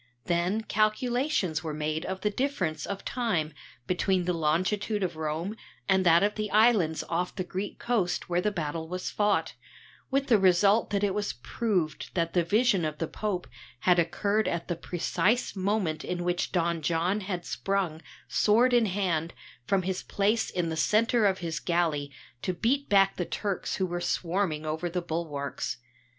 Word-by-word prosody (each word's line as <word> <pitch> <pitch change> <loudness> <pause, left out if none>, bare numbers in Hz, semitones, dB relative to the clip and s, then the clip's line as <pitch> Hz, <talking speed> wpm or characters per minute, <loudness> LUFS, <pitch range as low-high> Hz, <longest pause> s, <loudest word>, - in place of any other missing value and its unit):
Then 175 +5 +1
calculations 215 - 0
were 155 -2 -3
made 155 +1 -2
of 190 0 -4
the 210 - +1
difference 195 - -1
of 200 -1 -5
time 195 - -1 0.3
between 185 0 +1
the 180 - +1
longitude 185 +6 0
of 175 -3 -2
Rome 160 +6 -3 0.3
and 190 -1 +3
that 170 +1 +5
of 205 +1 +2
the 215 0 -3
islands 210 -7 +3
off 175 +2 -2
the 185 - -2
Greek 190 +3 -5
coast 210 -8 0
where 175 0 +1
the 210 - +1
battle 160 -4 -3
was 180 +2 -4
fought, 205 -1 +1 0.6
with 275 0 +1
the 230 -6 +4
result 195 +4 +4
that 200 0 0
it 200 -2 +2
was 205 0 -1
proved 185 - -2
that 170 -2 0
the 175 - +3
vision 210 +1 +3
of 155 -1 -2
the 165 - -2
Pope 200 -2 -3 0.4
had 180 -1 +4
occurred 200 +5 +1
at 170 0 -2
the 175 - -1
precise 185 +8 0
moment 190 -5 0
in 175 -1 -3
which 175 0 -1
Don 170 -2 0
John 170 +6 +1
had 185 -3 -4
sprung, 190 -5 -1 0.3
sword 235 +4 +3
in 235 -2 +4
hand, 175 -6 -1 0.3
from 195 -2 +2
his 185 0 -2
place 210 +3 +1
in 175 -2 -1
the 160 - -2
centre 215 +6 +3
of 190 -1 +1
his 165 0 -2
galley 160 -5 0 0.3
to 185 - -2
beat 270 +9 0
back 195 -1 +4
the 180 - 0
Turks 200 0 -2
who 190 - 0
were 175 -1 -3
swarming 175 -3 -1
over 160 +3 -2
the 180 +1 -1
bulwarks. 145 -6 -3
185 Hz, 175 wpm, -28 LUFS, 165-210 Hz, 0.6 s, that